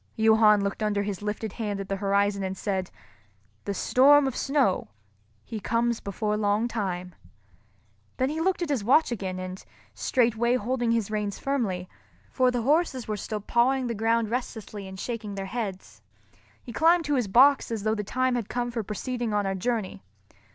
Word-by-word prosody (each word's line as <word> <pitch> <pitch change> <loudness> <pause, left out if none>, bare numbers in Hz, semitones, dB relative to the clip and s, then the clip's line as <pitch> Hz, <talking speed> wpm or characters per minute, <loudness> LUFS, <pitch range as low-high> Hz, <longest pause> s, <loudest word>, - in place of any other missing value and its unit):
Johann 220 -2 +5
looked 200 +2 -3
under 205 -1 0
his 200 -2 -4
lifted 210 0 -4
hand 210 -3 -3
at 195 - -5
the 195 - -2
horizon 200 0 +1
and 190 0 -3
said, 190 -3 -2 0.8
"The 200 - -2
storm 280 +7 +5
of 265 -2 -2
snow, 270 -9 +1 0.6
he 220 - -5
comes 230 +2 0
before 210 +1 -2
long 210 +2 +1
time." 185 -6 -3 1.0
Then 260 +1 +1
he 320 +1 -3
looked 370 0 +1
at 335 - -4
his 270 -8 0
watch 265 +6 +4
again, 190 -5 -3
and, 185 0 -6 0.3
straightway 235 0 +1
holding 245 0 0
his 225 -3 0
reins 210 -2 -2
firmly—for 245 +1 -2
the 245 -2 -1
horses 285 -2 +1
were 215 - -1
still 210 +1 -4
pawing 250 +5 +2
the 235 - -2
ground 225 0 +1
restlessly 220 -5 -5
and 190 0 -9
shaking 215 -3 -5
their 195 -1 -4
heads—he 215 +3 -9
climbed 330 +3 +4
to 295 - 0
his 250 -6 +1
box 265 +7 +5
as 225 -3 -3
though 215 0 +1
the 210 -1 -2
time 255 +5 0
had 235 -4 -2
come 245 0 -2
for 235 -1 -2
proceeding 225 +2 -3
on 205 -1 +1
our 195 - 0
journey. 205 - -2
220 Hz, 175 wpm, -26 LUFS, 200-245 Hz, 1.0 s, Johann